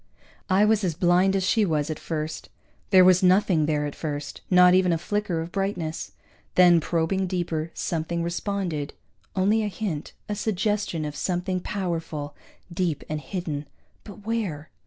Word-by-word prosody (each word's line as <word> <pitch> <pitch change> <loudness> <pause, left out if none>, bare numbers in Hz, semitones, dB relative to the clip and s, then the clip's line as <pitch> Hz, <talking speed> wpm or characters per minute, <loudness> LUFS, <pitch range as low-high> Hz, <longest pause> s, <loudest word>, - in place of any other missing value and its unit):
I 195 +2 +4
was 215 -1 +2
as 175 -4 0
blind 180 +3 +3
as 190 - +1
she 215 +4 +3
was, 155 -5 0
at 155 - -5
first. 155 -1 -4 0.4
There 185 -2 +7
was 185 0 +6
nothing 185 -4 +3
there, 150 -1 0
at 145 - -4
first, 145 -2 -5
not 180 -1 +7
even 185 -1 +4
a 165 - +2
flicker 190 -1 -2
of 165 +1 -6
brightness. 180 -5 -3 0.4
Then, 175 -2 +7
probing 170 +4 0
deeper, 170 -3 -2
something 170 +1 -2
responded, 170 -4 -3 0.4
only 200 +4 +3
a 210 - -1
hint, 190 -7 -4
a 210 - -2
suggestion 205 -5 -1
of 150 0 -5
something 180 +3 -1
powerful, 165 -7 -4 0.4
deep 170 -5 -1
and 155 0 -3
hidden 150 -2 -4 0.4
but 205 -1 -12
where? 200 -10 -3
180 Hz, 155 wpm, -25 LUFS, 160-195 Hz, 0.4 s, There